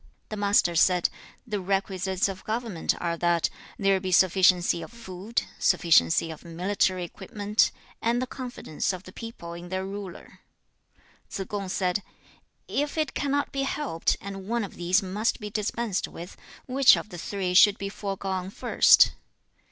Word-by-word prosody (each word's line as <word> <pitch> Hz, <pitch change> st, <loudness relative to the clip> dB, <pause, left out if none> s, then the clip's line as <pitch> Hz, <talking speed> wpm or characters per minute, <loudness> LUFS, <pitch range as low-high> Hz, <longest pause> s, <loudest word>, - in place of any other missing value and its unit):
The 215 Hz, -, -4 dB
Master 200 Hz, -4 st, +3 dB
said, 180 Hz, +1 st, +4 dB, 0.4 s
'The 210 Hz, -4 st, -3 dB
requisites 190 Hz, 0 st, 0 dB
of 195 Hz, -1 st, -7 dB
government 220 Hz, -6 st, -2 dB
are 170 Hz, -1 st, -1 dB
that 170 Hz, -1 st, +1 dB, 0.3 s
there 195 Hz, -1 st, +2 dB
be 185 Hz, 0 st, -4 dB
sufficiency 180 Hz, -1 st, +4 dB
of 165 Hz, -, -9 dB
food, 220 Hz, -1 st, -4 dB, 0.2 s
sufficiency 165 Hz, -, +3 dB
of 160 Hz, -, -10 dB
military 185 Hz, +2 st, 0 dB
equipment, 205 Hz, +4 st, 0 dB, 0.3 s
and 235 Hz, +1 st, +1 dB
the 255 Hz, -, -1 dB
confidence 245 Hz, -, -4 dB
of 185 Hz, 0 st, -7 dB
the 185 Hz, -, -12 dB
people 185 Hz, -6 st, -8 dB
in 175 Hz, +1 st, -9 dB
their 185 Hz, +1 st, -2 dB
ruler.' 195 Hz, -2 st, -8 dB, 0.9 s
2. 195 Hz, -, -4 dB
Tsze -, -, -16 dB
kung 200 Hz, -2 st, -4 dB
said, 185 Hz, +1 st, 0 dB, 0.7 s
'If 290 Hz, +2 st, -2 dB
it 310 Hz, -3 st, 0 dB
cannot 285 Hz, 0 st, -1 dB
be 275 Hz, -, -2 dB
helped, 270 Hz, -, -1 dB
and 195 Hz, -1 st, -8 dB
one 235 Hz, +1 st, 0 dB
of 200 Hz, -, -7 dB
these 180 Hz, +4 st, +2 dB
must 205 Hz, +7 st, -1 dB
be 210 Hz, -2 st, -6 dB
dispensed 215 Hz, -1 st, -2 dB
with, 175 Hz, +2 st, -10 dB, 0.3 s
which 265 Hz, +1 st, +6 dB
of -, -, -6 dB
the 175 Hz, -3 st, -8 dB
three 190 Hz, 0 st, -3 dB
should 205 Hz, +2 st, +7 dB
be 195 Hz, -, -4 dB
foregone 195 Hz, -2 st, -4 dB
first?' -, -, +5 dB
195 Hz, 160 wpm, -26 LUFS, 180-215 Hz, 0.9 s, should